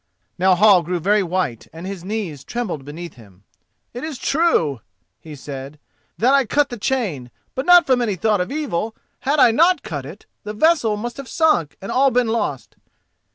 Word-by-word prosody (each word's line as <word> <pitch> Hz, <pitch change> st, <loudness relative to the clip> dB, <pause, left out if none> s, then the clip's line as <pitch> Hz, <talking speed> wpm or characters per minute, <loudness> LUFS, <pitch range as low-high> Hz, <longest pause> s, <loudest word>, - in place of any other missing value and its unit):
Now 185 Hz, 0 st, +4 dB
Hall 195 Hz, -1 st, +6 dB
grew 175 Hz, +2 st, -3 dB
very 205 Hz, +5 st, +2 dB
white 180 Hz, -, -2 dB
and 165 Hz, +3 st, -9 dB
his 190 Hz, -3 st, -6 dB
knees 190 Hz, -8 st, -4 dB
trembled 210 Hz, -, -4 dB
beneath 160 Hz, +4 st, -8 dB
him. 100 Hz, -6 st, -18 dB, 0.5 s
"It 245 Hz, -, -7 dB
is 310 Hz, -4 st, -5 dB
true," 210 Hz, -, +1 dB, 0.4 s
he 150 Hz, +5 st, -11 dB
said, 140 Hz, +1 st, -8 dB, 0.4 s
"that 250 Hz, +5 st, +3 dB
I 275 Hz, -1 st, +5 dB
cut 285 Hz, +4 st, +1 dB
the 240 Hz, -, -6 dB
chain, 200 Hz, -, -2 dB, 0.2 s
but 260 Hz, +5 st, -4 dB
not 355 Hz, -1 st, +7 dB
from 255 Hz, -2 st, +2 dB
any 215 Hz, -5 st, 0 dB
thought 205 Hz, +2 st, +1 dB
of 180 Hz, -, -4 dB
evil. 225 Hz, -, -3 dB, 0.2 s
Had 285 Hz, +3 st, 0 dB
I 240 Hz, -, +7 dB
not 335 Hz, +5 st, +3 dB
cut 140 Hz, -4 st, -5 dB
it 170 Hz, +8 st, -12 dB, 0.2 s
the 210 Hz, -, -5 dB
vessel 235 Hz, -4 st, +2 dB
must 240 Hz, +3 st, -5 dB
have 275 Hz, -3 st, -8 dB
sunk 310 Hz, -, +1 dB
and 195 Hz, -, -5 dB
all 270 Hz, +2 st, +4 dB
been 250 Hz, -2 st, +1 dB
lost." 210 Hz, -, -3 dB
210 Hz, 190 wpm, -20 LUFS, 165-260 Hz, 0.5 s, not